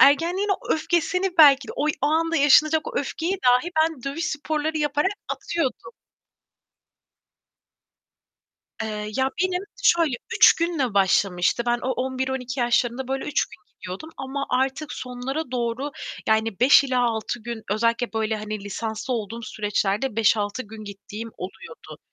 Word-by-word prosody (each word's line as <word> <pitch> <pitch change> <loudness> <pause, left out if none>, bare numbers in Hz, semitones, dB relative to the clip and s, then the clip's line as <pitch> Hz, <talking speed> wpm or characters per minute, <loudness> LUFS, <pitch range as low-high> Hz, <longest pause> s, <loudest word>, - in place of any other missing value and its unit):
Ergenliğin 345 +8 +4
o 390 - 0
öfkesini 350 +3 0
belki 280 -4 +7
de - - -5
oy 300 +2 +1
o - - +4
anda 330 +2 +1
yaşanacak 305 - +4
o - - -2
öfkeyi 365 +4 -3
dahi 250 +7 +4
ben 320 -5 -2
dövüş 280 +6 -3
sporları 310 +1 -2
yaparak 295 +4 +1 0.2
atıyordum. 335 - -3 2.9
Eee, 210 -1 -4
ya, 265 0 +1
benim 370 0 0 0.2
şöyle 330 -7 +3 0.2
3 - - +8
günle 320 -10 -1
başlamıştı. 190 +1 +2
Ben 240 0 +2
o - - -2
11-12 260 0 -3
yaşlarında, 240 +1 +1
böyle, 270 0 -2
3 295 - 0
gün 210 - -14 0.2
gidiyordum 190 - -8
ama 275 +1 -4
artık 265 +4 -1
sonlara 255 +4 -5
doğru, 245 +3 -2 0.4
yani 220 -1 +1
5 270 +3 +7
ila 255 -2 +1
6 220 +1 -4
gün 235 -1 -6
özellikle, 230 +2 0
böyle, 220 0 -1
hani, 215 -1 -5
lisanslı 220 +4 -3
olduğum 230 +1 -5
süreçlerde 210 +2 -1
5-6 215 +1 +2
gün 215 0 -11
gittiğim 205 +3 -8
oluyordu. 195 - -10
255 Hz, 140 wpm, -24 LUFS, 220-305 Hz, 2.9 s, 3